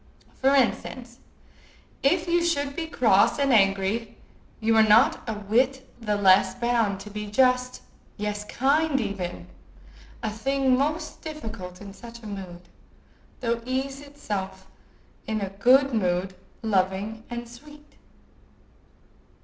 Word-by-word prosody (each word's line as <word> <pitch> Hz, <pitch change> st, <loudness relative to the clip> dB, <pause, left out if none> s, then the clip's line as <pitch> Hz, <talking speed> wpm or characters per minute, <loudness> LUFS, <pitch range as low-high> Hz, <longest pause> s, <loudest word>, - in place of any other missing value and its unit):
For 270 Hz, +1 st, +2 dB
instance, 250 Hz, -1 st, -1 dB, 0.8 s
if 330 Hz, +5 st, +2 dB
you 345 Hz, 0 st, +2 dB
should 285 Hz, -4 st, 0 dB
be 330 Hz, -1 st, -3 dB
cross 225 Hz, -9 st, +3 dB
and 280 Hz, -2 st, +2 dB
angry, 200 Hz, +2 st, +1 dB, 0.4 s
you 225 Hz, 0 st, +2 dB
are 220 Hz, -, +7 dB
not 215 Hz, 0 st, +5 dB
a 220 Hz, -, -2 dB
whit 250 Hz, +6 st, 0 dB
the 210 Hz, -2 st, 0 dB
less 190 Hz, -1 st, +4 dB
bound 235 Hz, -5 st, 0 dB
to 210 Hz, +1 st, -10 dB
be 210 Hz, 0 st, -5 dB
just, 250 Hz, +3 st, +1 dB, 0.3 s
yes, 210 Hz, 0 st, -3 dB
kind 280 Hz, +5 st, +1 dB
even—a 180 Hz, -, -7 dB
thing 265 Hz, +4 st, +1 dB
most 305 Hz, +4 st, -2 dB
difficult 220 Hz, -, -7 dB
in 200 Hz, -1 st, -9 dB
such 235 Hz, +2 st, -12 dB
a -, -, -10 dB
mood—though 200 Hz, +4 st, -8 dB
ease 265 Hz, +2 st, -3 dB
itself 200 Hz, -10 st, -6 dB, 0.6 s
in 220 Hz, 0 st, -1 dB
a 195 Hz, -2 st, -4 dB
good 255 Hz, +7 st, +4 dB
mood, 185 Hz, -3 st, 0 dB, 0.3 s
loving 200 Hz, +1 st, -1 dB
and 240 Hz, 0 st, -5 dB
sweet. 295 Hz, +5 st, -15 dB
230 Hz, 120 wpm, -25 LUFS, 200-270 Hz, 0.8 s, are